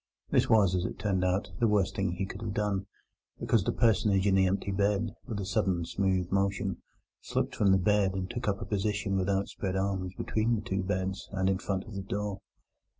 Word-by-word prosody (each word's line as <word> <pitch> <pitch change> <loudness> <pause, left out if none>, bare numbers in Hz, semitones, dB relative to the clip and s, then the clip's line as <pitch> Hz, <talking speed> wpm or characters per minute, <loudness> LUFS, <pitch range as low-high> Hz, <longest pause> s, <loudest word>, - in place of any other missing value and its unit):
This - - +3
was, 100 -5 +5
as 90 -1 +1
it - - -4
turned 95 -2 0
out, 95 +2 0
the 115 - +4
worst 105 -3 +2
thing 95 -3 0
he 95 +2 -2
could 100 - -8
have 110 -3 -4
done, 100 -2 -1 0.5
because 110 -5 +2
the - - 0
personage 105 -4 +3
in 100 - +3
the 95 -1 +4
empty 100 +1 -1
bed, 100 +2 +1 0.2
with 110 -5 -3
a 100 - -3
sudden 95 -4 0
smooth 95 -1 0
motion, 100 -1 0 0.4
slipped - - -2
from 100 -2 +3
the 95 - +6
bed 95 0 +2
and 95 -1 -2
took 120 +3 -5
up 100 -1 +1
a - - -6
position, 105 0 -1
with 95 0 0
outspread 95 -1 -1
arms, 95 -1 -1
between 110 +2 +1
the 105 - -4
two 95 0 0
beds, 95 0 -2
and 95 0 +2
in 95 - -1
front 95 -1 -2
of 110 - -11
the 100 - -4
door. 100 0 -3
100 Hz, 215 wpm, -30 LUFS, 95-105 Hz, 0.5 s, the